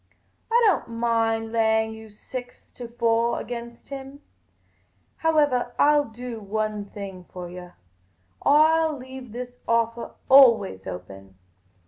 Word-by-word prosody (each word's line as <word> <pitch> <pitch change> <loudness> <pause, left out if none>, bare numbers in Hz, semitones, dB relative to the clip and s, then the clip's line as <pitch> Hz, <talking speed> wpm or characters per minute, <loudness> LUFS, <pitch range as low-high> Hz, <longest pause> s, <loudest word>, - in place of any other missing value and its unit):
I 470 - +5
don't 355 - +2
mind 225 -1 0
laying 220 -1 +2
you 220 0 -11
six 245 +4 -9
to 245 - -8
four 230 0 +1
against 235 -1 -8
him. 275 +1 -8 1.0
Howevah, 290 -7 +2
I 295 - +5
'11 290 -5 +1
do 240 -1 -6
one 215 0 -3
thing 195 -3 -9
for 180 -1 -7
yah: 180 0 -10 0.7
I 310 +3 +5
'11 315 -3 -1
leave 260 -2 -10
this 245 +1 -7
offah 230 0 0
always 230 - +5
open. 95 +1 -9
230 Hz, 125 wpm, -24 LUFS, 215-260 Hz, 1.0 s, I